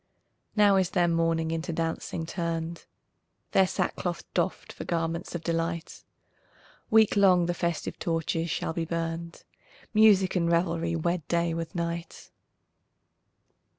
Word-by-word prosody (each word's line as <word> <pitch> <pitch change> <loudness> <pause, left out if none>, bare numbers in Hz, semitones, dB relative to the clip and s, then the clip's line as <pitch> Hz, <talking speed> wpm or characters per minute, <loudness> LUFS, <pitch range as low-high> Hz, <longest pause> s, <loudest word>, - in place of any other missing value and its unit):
Now 205 -2 +5
is 185 -2 +2
their 175 -1 +2
mourning 165 -1 +1
into 165 +1 -2
dancing 165 0 -3
turned, 165 0 -3 0.7
Their 190 -1 +4
sackcloth 175 -1 -2
doffed - - -1
for - - -7
garments 165 +1 -2
of 170 - -4
delight, 165 0 -2 0.9
Week 220 -1 +5
long 185 -3 +5
the 175 - 0
festive 170 -2 -3
torches 165 0 -1
shall 160 - -2
be 165 - -2
burned, 165 0 -4 0.5
Music 205 -4 +5
and 170 -2 +2
revelry 170 -1 +1
wed 170 -1 -1
day 170 -1 +1
with 165 0 -5
night. 170 0 -4
170 Hz, 125 wpm, -28 LUFS, 165-175 Hz, 0.9 s, Now